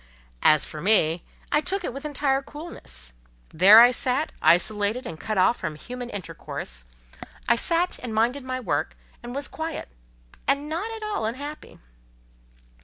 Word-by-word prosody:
As 155 -1 +5
for 150 - -8
me, 170 -4 +4 0.3
I 295 - +3
took 385 +6 -2
it - - -3
with 275 +3 -7
entire 275 -2 0
coolness. 270 - -7 0.4
There 195 +7 +8
I 240 +1 +8
sat, 255 +4 0
isolated 210 +7 +3
and 160 -1 -7
cut 215 -2 -3
off 190 +6 +4
from 155 - -4
human 245 +9 -7
intercourse; 115 - -6 0.6
I - - +5
sat 340 +8 0
and 245 - -6
minded 235 +5 +1
my 255 0 -3
work, 250 - -2 0.2
and 240 +1 -8
was 280 +1 -2
quiet, 320 -1 -5 0.6
and 280 +2 +1
not 345 +9 -3
at 445 -1 -7
all 420 - -2
unhappy. 285 +6 -7
250 Hz, 155 wpm, -25 LUFS, 205-295 Hz, 0.6 s, There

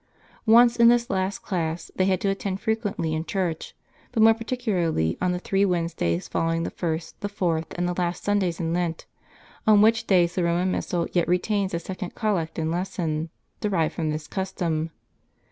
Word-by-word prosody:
Once 235 +2 +6
in 235 0 +7
this 240 +1 +4
last 190 +1 -1
class, 165 -3 -3
they 185 - +2
had 185 -1 +2
to - - -1
attend 195 -1 -2
frequently 210 -8 -1
in 160 0 -1
church, 175 -3 -3 0.4
but 220 - +3
more 225 0 +8
particularly 210 - -1
on 180 0 +2
the 180 - -1
three 195 +2 0
Wednesdays 165 - 0
follow 165 0 0
ing 165 0 -1
the - - -3
first, 165 -1 -4
the 205 - -2
fourth, 170 -5 -1
and 175 0 0
the 180 - -1
last 175 -1 -2
Sundays 195 -5 0
in 165 -1 -1
Lent, 170 -2 -2 0.6
on 215 -1 +7
which 225 +1 +3
days 175 -3 +4
the 180 - 0
Roman 175 +2 +1
Missal 175 -2 -1
yet 175 -2 +2
retains 190 +1 0
a - - -1
second 185 +1 -6
collect 195 -8 -1
and 160 -1 -1
lesson, 170 -3 -2 0.3
derived 185 -7 +1
from 160 -3 -2
this 150 0 -3
custom. 170 -4 -2
180 Hz, 185 wpm, -25 LUFS, 165-200 Hz, 0.6 s, more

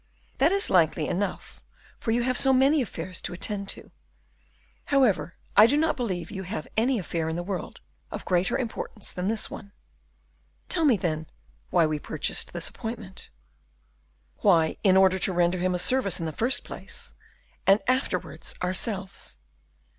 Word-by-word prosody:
"That - - +5
is 395 +1 +2
likely 160 -3 +3
enough, 190 +1 -3 0.4
for - - -4
you 235 +1 +2
have 255 +1 0
so 270 +2 +5
many 270 +3 +4
affairs 185 -5 -5
to - - -3
attend 200 +2 -2
to. - - -4 0.9
However, 255 -11 +2 0.2
I 215 - +9
do 285 +5 +2
not 315 0 +2
believe 185 - -3
you 190 - -5
have 190 +4 -5
any 245 +3 +2
affair 165 -4 -2
in 160 - -2
the 175 - -3
world 190 0 -5 0.3
of - - -6
greater 180 0 +1
importance 225 -4 -4
than 180 +1 -3
this 220 +1 0
one." 200 -1 -9 1.0
"Tell 335 -3 +1
me, 255 -7 +5
then, 160 -3 -2 0.4
why 170 -2 +4
we 155 -1 -1
purchased - - -2
this - - -1
appointment." 225 -5 -7 1.1
"Why, 165 -6 +4
in 190 -2 +5
order 190 0 +5
to 185 - +3
render 175 +1 +2
him 180 0 +1
a - - +1
service 200 -1 +2
in 165 - -3
the 160 - -2
first 235 - +1
place, - - -5 0.5
and 195 +2 +6
afterwards 255 +2 -1
ourselves." 190 +1 -3
195 Hz, 160 wpm, -26 LUFS, 175-235 Hz, 1.1 s, I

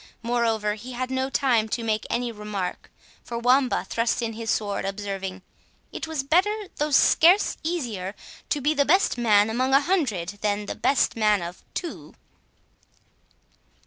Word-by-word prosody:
Moreover, 230 -3 0
he 240 +4 -9
had 255 +1 -3
no 260 0 -1
time 245 -6 +1
to 230 - -2
make 215 -1 -1
any 240 0 -1
remark, 210 -4 -5 0.3
for 235 - -5
Wamba 250 +2 +2
thrust 235 +1 0
in 225 -1 -2
his 225 0 -1
word, 205 -2 -4
observing, 195 -1 -5 0.5
"It - - -5
was 315 -4 -2
better, 390 +8 +1
though 300 +1 0
scarce 340 +6 +5
easier, 230 - -3 0.3
to 290 - 0
be 295 +3 +2
the 285 -2 +3
best 370 +8 +3
man 210 -3 +4
among 255 +4 +1
a - - +7
hundred, 215 - -1
than 205 0 -1
the - - -4
best 275 - +1
man 210 -4 +2
of 175 +1 -8
two." 345 - -6
235 Hz, 155 wpm, -25 LUFS, 210-275 Hz, 0.5 s, a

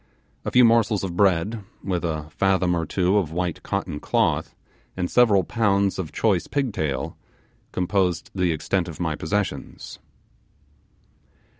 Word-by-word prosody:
A - - 0
few 125 -1 +6
morsels 115 -3 +3
of 90 -3 -3
bread, 100 +3 +2 0.2
with 90 -3 -2
a 80 -3 -2
fathom 95 +1 +2
or 80 -2 -2
two 95 +4 +2
of 80 -6 -3
white 90 0 -2
cotton 95 -6 -3
cloth, - - 0 0.4
and 90 -1 -2
several 110 -6 +5
pounds 100 -1 +1
of 80 -5 -4
choice 100 -6 +1
pigtail, 105 - -2 0.5
composed 90 -1 0
the 90 -3 +1
extent 85 +3 -1
of 85 - -8
my 80 -3 -1
possessions. 100 +7 -4
95 Hz, 135 wpm, -24 LUFS, 85-100 Hz, 0.5 s, few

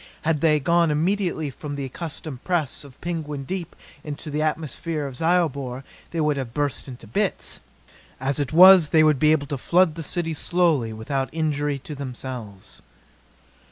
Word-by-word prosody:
Had 155 -2 +1
they 155 -2 +4
gone 170 +3 +3
immediately 165 -1 0
from 145 +2 -7
the 140 -1 -3
accustomed 150 -1 -6
press 165 -8 -1
of 140 -3 -15
Penguin 155 -5 -4
Deep 180 +3 -5 0.3
into 150 +1 -6
the 150 +1 -1
atmosphere 155 0 -2
of 135 -2 -6
Zyobor, 140 -6 0 0.3
they 170 - -4
would 150 -2 +1
have 125 -3 -5
burst 145 -1 -1
into 125 -3 -10
bits. 110 - -1 0.6
As 135 +2 0
it 140 -3 -1
was 180 -1 +8
they 155 +1 +5
would 155 -3 +4
be 155 0 +5
able 150 -2 +2
to 140 -2 -4
flood 175 +3 +3
the 165 - -6
city 165 +1 -2
slowly, 160 -7 +1
without 135 +5 -3
injury 150 -2 -1
to 140 +3 -8
themselves. 120 - -8
150 Hz, 165 wpm, -24 LUFS, 135-165 Hz, 0.6 s, was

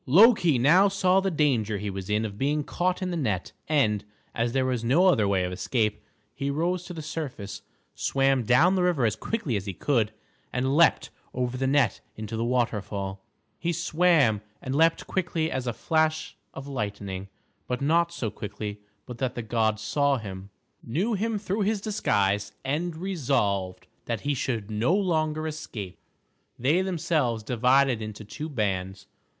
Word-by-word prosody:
Loki 175 - +6
now 165 +11 +6
saw 190 -1 +3
the 195 0 0
danger 130 - +1
he 100 0 -3
was 95 0 -6
in 105 +1 +1
of 100 -1 -6
being 145 +2 +1
caught 180 +5 -1
in 180 - -2
the - - -2
net, 105 - -1 0.2
and, 110 -9 +2 0.3
as 115 0 0
there 130 +1 +1
was 125 -3 -1
no 140 +11 +4
other 110 - +4
way 95 -2 +2
of 90 - -2
escape, 105 +1 -1 0.3
he 140 - -3
rose 170 +5 0
to 180 - -8
the 160 - -6
surface, 145 -10 -5 0.3
swam 135 -1 +2
down 125 - +4
the 190 - +1
river 175 -8 +2
as 110 -1 +1
quickly 145 - -2
as 100 0 -3
he 95 - -4
could, 115 - +1 0.4
and 130 +2 0
leaped 170 +1 +4 0.2
over 125 0 -1
the 130 +1 0
net 135 -6 +2
into 110 +1 -6
the 115 - -1
waterfall. 105 -5 -1 0.4
He 170 - 0
swam 165 - +3 0.2
and 130 - -4
leaped 165 +3 +3
quick 180 -2 -2
as 145 -6 -1
a - - +1
flash 155 +5 0 0.2
of 135 - -8
lightning, 100 -6 -4 0.4
but 125 - -2
not 165 +4 +2
so 120 -11 -3
quickly 105 0 -6 0.3
but 120 -2 -9
that 130 -2 -1
the 120 - -4
gods 110 -1 0
saw 140 +3 +2
him, 95 -3 -8 0.3
knew 180 - -1
him 220 +2 0
through 205 +1 -2
his 210 +1 +1
disguise, 105 - 0
and 160 +4 -1
resolved 105 - -1 0.2
that - - -2
he 145 - 0
should 115 -5 -2
no 115 - +2
longer 155 -5 0
escape. 110 - -6 0.6
They 145 +9 +2
themselves 160 - 0
divided 125 +1 +3
into 110 0 -6
two 155 +9 -6
bands. 95 - -2
130 Hz, 170 wpm, -26 LUFS, 105-165 Hz, 0.6 s, Loki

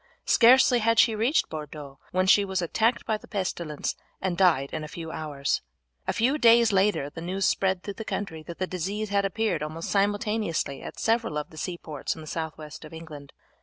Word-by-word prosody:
Scarcely 250 +1 +6
had 230 0 +2
she 225 0 +6
reached 230 +8 +2
Bordeaux 150 -3 -8
when 185 +1 +1
she 200 +2 +6
was 190 -1 -2
attacked 220 +7 +1
by 220 -1 0
the - - -16
pestilence 175 -6 -3 0.2
and 185 -2 -1
died 170 -7 +3
in 155 - -3
a - - -5
few 160 +1 -7
hours. 145 -4 -2 0.5
A - - +2
few 265 +7 +1
days 235 -2 +6
later 195 -6 +2
the 165 - -8
news 185 +3 -1
spread 190 -2 +1
through 200 - -5
the 220 - -7
country 195 -7 -4
that 170 +2 -9
the 185 - -1
disease 195 +4 -3
had 200 0 +1
appeared 195 -4 0
almost 155 +2 -5
simultaneously 205 -7 0
at - - -8
several 230 -8 +1
of 150 - -4
the - - -13
seaports 160 -4 -4
in 160 - -10
the - - -9
south 160 0 -4
west 150 0 -10
of 155 - -11
England. 155 -3 -10
185 Hz, 205 wpm, -26 LUFS, 155-215 Hz, 0.5 s, Scarcely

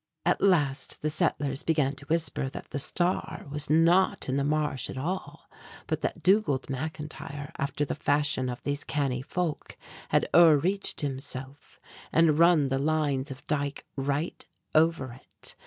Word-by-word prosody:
At - - +2
last 145 -10 +1
the 155 - +1
settlers 145 -4 0
began 150 -4 +1
to 140 - -8
whisper 160 -4 0
that - - -9
the 140 - -2
Star 175 +1 0
was 150 0 -2
not 165 +4 +3
in 130 - 0
the 140 - +1
marsh 150 -3 0
at - - -6
all, 175 +8 -4 0.4
but - - -2
that - - -3
Dugald 190 -9 +3
McIntyre, 150 +1 -6
after 140 +1 -1
the - - -3
fashion 145 -3 +1
of 125 - -6
these 145 0 -2
canny 135 -4 -1
folk, 165 +2 -3 0.3
had - - +2
o'er 165 -3 +8
reached 190 +7 -1
himself, 135 0 -5 0.3
and 160 -2 +4
run 170 -3 +6
the 135 0 0
lines 145 -2 0
of 135 0 -8
the 150 - 0
dike 145 -1 -4
right 140 +4 -2 0.3
over 155 -5 +2
it. - - -6
145 Hz, 160 wpm, -28 LUFS, 140-160 Hz, 0.4 s, o'er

